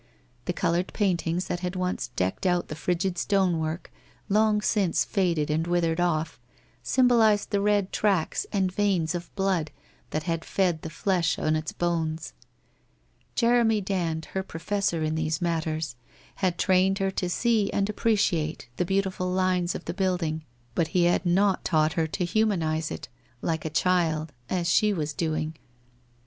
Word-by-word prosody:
The - - 0
coloured 175 +2 0
paintings 180 -3 0
that 175 - -3
had 180 +1 -3
once 185 -5 -1
decked 95 - -1
out 175 -1 +1
the 155 - -4
frigid 175 +2 -1
stonework, 170 -5 0 0.4
long 210 +1 +3
since 200 -3 +1
faded 170 -7 0
and 160 +2 0
withered 170 -1 +1
off, 165 -2 0 0.4
symbolized 230 -6 +3
the 200 -2 +1
red 205 -2 +2
tracks 195 -6 +1
and 190 -2 +1
veinings 185 -5 +1
of 175 -1 -5
blood 190 -6 0 0.4
that 155 - -2
had 165 0 -2
fed 180 -5 0
the 160 - -6
flesh 170 0 0
on 155 0 +1
its 155 0 -2
bones. 165 - -2 1.0
Jeremy 235 -2 +3
Dand, 175 -5 -2
her 190 - 0
professor 190 -1 -2
in 155 0 0
these 160 0 -1
matters, 160 -5 -1 0.4
had 185 -3 0
trained 190 +1 +3
her 195 -1 0
to 180 -1 -2
see 220 +1 +1
and 200 -1 +1
appreciate 180 - 0
the 180 - +1
beautiful 190 -1 0
lines 185 -1 +1
of - - -6
the - - -3
building, 175 -5 -1 0.3
but 165 +3 +1
he 175 - +5
had 175 +1 +2
not 190 +2 +3
taught 155 -2 +2
her 160 0 0
to 175 +3 -2
humanize 170 -6 +1
it, 145 - -6 0.4
like 160 -1 -1
a - - -1
child, 160 -2 +1 0.2
as 175 -2 0
she 210 +3 +3
was 155 -4 -2
doing. 155 0 -2
175 Hz, 160 wpm, -26 LUFS, 160-195 Hz, 1.0 s, he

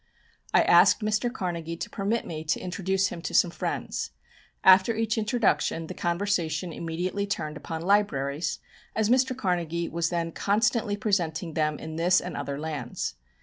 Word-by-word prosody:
I - - +5
asked 180 +4 +6
Mr. 215 +3 0
Carnegie 170 -7 -4
to - - -4
permit 215 +3 -1
me 155 -1 -5
to 155 - 0
introduce 190 +1 0
him 170 - -7
to - - -4
some 175 - +5
friends. - - -3 0.5
After 190 +4 +6
each 225 0 0
introduction 215 -6 +1
the - - -6
conversation 170 -2 -1
immediately 180 +5 -3
turned 155 -6 -3
upon 160 +2 -5
libraries, 165 -6 +1 0.4
as 220 +1 +2
Mr. 255 0 +3
Carnegie 170 -5 -1
was 165 0 -1
then 170 -1 -2
constantly 210 +2 +1
presenting 175 -6 -1
them 155 -1 0
in 160 +1 -7
this 180 +2 +4
and 180 - -6
other 140 0 -3
lands. 155 - -4
180 Hz, 155 wpm, -27 LUFS, 165-205 Hz, 0.5 s, asked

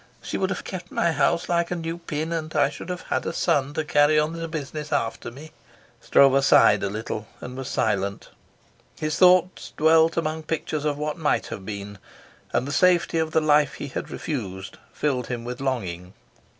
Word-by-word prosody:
She - - -6
would 190 - 0
have - - -3
kept 180 -1 -7
my 170 - +1
house 160 +3 +1
like 170 -1 +1
a 180 - -2
new 165 0 -4
pin, 160 0 -3
and 160 -1 -4
I 145 -2 +4
should 155 - -9
have 180 0 -4
had - - 0
a - - -1
son 145 -4 0
to 155 - 0
carry 145 +1 +4
on 150 +1 +1
the 165 0 -4
business 150 -1 -5
after 115 -7 -1
me." 145 +6 -12 0.5
Stroeve 135 0 +5
sighed 105 -6 +6
a 100 - -1
little 110 0 -5
and 125 - -8
was 130 -1 -5
silent. 100 -2 -1 0.7
His 155 0 -1
thoughts 180 0 +4
dwelt 160 +1 +4
among 160 -1 -1
pictures 155 -1 -3
of 145 -1 0
what 150 +2 -3
might 150 - +1
have 95 - -8
been, 100 -1 -6 0.5
and 125 - 0
the - - -3
safety 170 +1 +3
of 160 -1 0
the 160 - +2
life 150 -2 +3
he - - -6
had - - -5
refused 95 - -5
filled 130 -5 -1
him 120 -2 -4
with 125 +2 -6
longing. 95 -9 -3
150 Hz, 195 wpm, -24 LUFS, 125-165 Hz, 0.7 s, sighed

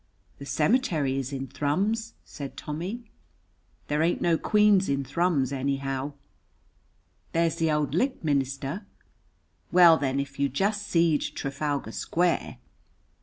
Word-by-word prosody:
"The 140 - -8
cemetery 155 - +1
is 135 0 -4
in 135 -1 -4
Thrums," 200 - -1
said 140 -3 -8
Tommy. 190 +10 -5 0.8
"There 150 +1 0
ain't 170 +2 +2
no 170 -1 +2
queens 210 +1 +3
in 140 0 0
Thrums, 140 -1 0
anyhow." 135 +1 -2 1.2
"There's 165 0 +1
the 165 -2 +1
auld 150 -2 0
licht 255 - 0
minister." 140 - -1 0.8
"Well, 175 -2 +7
then, 135 -2 -1
if 140 0 -5
you 140 0 +2
jest 200 +8 -1
seed 165 -3 +3
Trafalgar 140 -3 -3
Square!" 175 +7 -1
150 Hz, 120 wpm, -27 LUFS, 140-180 Hz, 1.2 s, Well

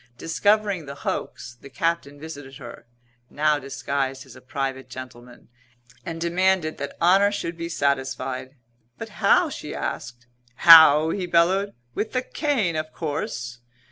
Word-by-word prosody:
Discovering 200 0 0
the 140 - -7
hoax, 120 -3 -5
the 140 - -12
Captain 145 -1 -2
visited 145 -4 -9
her 120 -2 -11 0.4
(now 150 0 +1
disguised 135 0 -3
as 130 -2 -15
a 125 - -14
private 135 -1 -4
gentleman) 125 -1 -11 0.6
and 165 -2 -6
demanded 175 -1 +1
that 140 0 -6
honour 195 +4 +4
should 170 -4 -4
be 170 0 -5
satisfied. 130 -3 -2 0.4
"But - - -7
how?" - - +4
she - - -7
asked. 120 0 -5 0.3
"How?" 160 0 +8
he 185 -3 -3
bellowed. 185 +4 +2 0.2
"With 215 - -3
the 255 0 0
cane 250 - -1
of 155 0 -3
course!" 125 -7 -5
150 Hz, 140 wpm, -24 LUFS, 130-170 Hz, 0.6 s, How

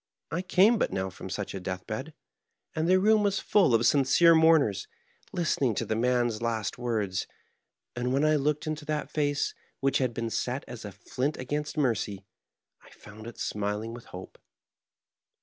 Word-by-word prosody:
I 170 - -1
came 195 +5 +4
but - - +1
now 95 0 -2
from - - -9
such - - -4
a 95 - -4
death 90 0 -5
bed, 135 +9 -5 0.6
and 160 +1 0
the 185 +1 +5
room 215 +2 +4
was 200 -1 +1
full 190 - +3
of 115 +1 +2
sincere 145 +5 +5
mourners, 160 - +4 0.4
listening 155 - 0
to - - -1
the 110 - -1
man's 120 -1 +1
last 115 -2 -2
words; 105 -6 -1 0.7
and 125 +1 -1
when 140 +3 +2
I 155 0 +4
looked 150 +1 0
into 155 -1 -3
that 150 0 -3
face, 145 -2 0 0.3
which 135 0 +1
had 130 -3 +1
been 115 -1 -3
set 125 +4 -2
as 120 -3 -8
a 105 - -6
flint 130 +9 -3
against 145 +4 -4
mercy, 105 -8 -1 0.6
I - - -18
found 110 +2 -13
it 120 - -9
smiling 105 +2 -3
with 120 0 -10
hope." 90 +1 -10
130 Hz, 175 wpm, -28 LUFS, 110-155 Hz, 0.7 s, the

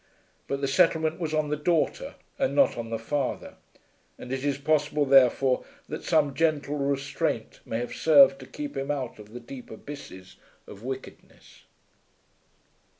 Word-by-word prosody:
But 140 0 -2
the 140 - 0
settlement 160 +1 +2
was 160 -3 -2
on 155 -1 0
the 150 - 0
daughter 170 - 0 0.2
and - - 0
not 280 - +4
on 115 -1 -5
the 115 - -2
father; 135 +4 -3 0.6
and 125 - -9
it 135 0 -2
is 140 -1 0
possible 150 0 +1
therefore 135 -1 +4 0.2
that - - -6
some 145 -3 +2
gentle 150 -1 0
restraint 140 -1 -2
may 115 - -2
have 120 +1 -4
served 275 - +6
to - - -11
keep 295 -1 -6
him 135 +1 -3
out 130 -6 -3
of 105 0 -13
the 120 - -7
deep 125 +1 -10
abysses 110 -6 -10 0.3
of 100 - -12
wickedness. 130 +1 -9
140 Hz, 155 wpm, -27 LUFS, 130-155 Hz, 0.6 s, served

